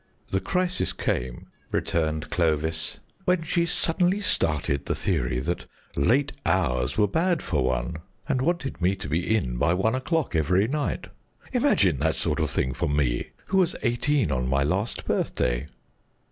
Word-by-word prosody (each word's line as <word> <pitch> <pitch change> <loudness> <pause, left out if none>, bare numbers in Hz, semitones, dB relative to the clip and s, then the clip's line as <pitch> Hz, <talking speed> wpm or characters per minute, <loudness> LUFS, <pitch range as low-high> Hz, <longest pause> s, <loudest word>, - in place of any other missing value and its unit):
"The 95 - +2
crisis 180 - -1
came," 60 0 -2 0.3
returned 80 -1 -1
Clovis, 80 -1 0 0.3
"when 180 -2 +2
she 170 +1 +1
suddenly 180 +4 +1
started 75 - 0
the - - 0
theory 65 -10 0
that 85 +6 -3 0.3
late 130 - +3
hours 70 -7 +1
were 105 -1 +4
bad 170 - +1
for 75 -7 0
one, 65 +5 -1 0.3
and 135 -4 +1
wanted 160 - -1
me 90 +3 +3
to 95 - -7
be 90 +8 +1
in - - -2
by 85 +8 +3
one 105 +5 +2
o'clock 130 - 0
every 90 +6 +3
night. 145 +3 -1 0.5
Imagine 105 - +3
that 80 +2 +1
sort 80 0 -1
of 75 -3 +1
thing 65 - 0
for 65 - -1
me, 70 -5 +1 0.2
who 190 - 0
was 180 -2 +2
eighteen 125 - +1
on 65 -1 0
my 70 +1 +2
last 95 +10 -1
birthday." - - 0
90 Hz, 160 wpm, -26 LUFS, -, 0.5 s, were